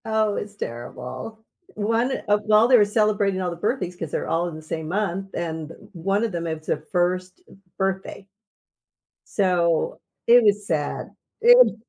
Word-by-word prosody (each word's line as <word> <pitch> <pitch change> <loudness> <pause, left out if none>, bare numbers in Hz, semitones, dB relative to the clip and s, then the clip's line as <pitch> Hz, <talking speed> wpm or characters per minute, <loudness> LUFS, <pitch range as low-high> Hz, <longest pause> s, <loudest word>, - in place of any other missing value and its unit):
Oh, 220 -2 +1
it's 205 0 -5
terrible. 130 - -7 0.3
One, 230 +5 0
uh 205 0 +4
while 215 +2 +4
they 250 0 +7
were 210 - +5
celebrating 205 -2 +1
all 180 - -1
the - - -5
birthdays, 185 -1 -2
'cause 165 -4 -6
they're - - -2
all 170 +2 0
in 165 - -9
the 155 - -8
same 155 0 -5
month, 195 +1 -2
and 160 -2 -4 0.2
one 195 +5 0
of 230 - -1
them, 170 -2 -3
it's 160 -1 -5
a - - +2
1st 185 - -1 0.4
birthday. 195 0 -3 1.0
So, 175 -4 +1 0.3
it 240 +1 +7
was 205 -1 +3
sad. 150 -5 -2 0.3
It - - +7
195 Hz, 160 wpm, -23 LUFS, 170-215 Hz, 1.0 s, they